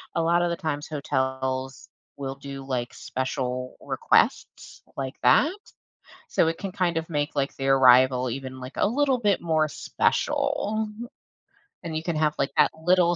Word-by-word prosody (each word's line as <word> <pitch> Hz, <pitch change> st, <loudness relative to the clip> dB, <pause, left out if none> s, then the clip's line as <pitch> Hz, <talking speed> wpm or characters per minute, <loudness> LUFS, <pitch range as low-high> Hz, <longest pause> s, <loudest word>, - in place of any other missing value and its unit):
A 165 Hz, -, +2 dB
lot 170 Hz, +1 st, +3 dB
of 175 Hz, -, +1 dB
the 170 Hz, -, -2 dB
times 145 Hz, -2 st, -3 dB
hotels 130 Hz, -2 st, -2 dB, 0.3 s
will 135 Hz, -1 st, -4 dB
do, 140 Hz, 0 st, -8 dB
like, 125 Hz, -3 st, -3 dB
special 130 Hz, -1 st, -3 dB
requests -, -, 0 dB
like 135 Hz, 0 st, -4 dB
that. 305 Hz, -, +5 dB, 0.8 s
So, -, -, +2 dB
it 165 Hz, -, -4 dB
can 195 Hz, -2 st, -5 dB
kind 180 Hz, -4 st, 0 dB
of 160 Hz, +1 st, -3 dB
make 150 Hz, -1 st, -2 dB
like 140 Hz, 0 st, 0 dB
the 135 Hz, -, -3 dB
arrival 130 Hz, -1 st, +5 dB
even 130 Hz, +1 st, -6 dB
like 130 Hz, +2 st, -8 dB
a -, -, +3 dB
little 270 Hz, +3 st, +2 dB
bit 205 Hz, -4 st, +1 dB
more 160 Hz, -2 st, +2 dB
special. 280 Hz, -, 0 dB, 1.0 s
And 165 Hz, -2 st, -5 dB
you -, -, -2 dB
can 170 Hz, -1 st, -2 dB
have 155 Hz, -1 st, +2 dB
like 140 Hz, -, 0 dB
that -, -, +5 dB
little 175 Hz, 0 st, +4 dB
145 Hz, 165 wpm, -25 LUFS, 130-175 Hz, 1.0 s, that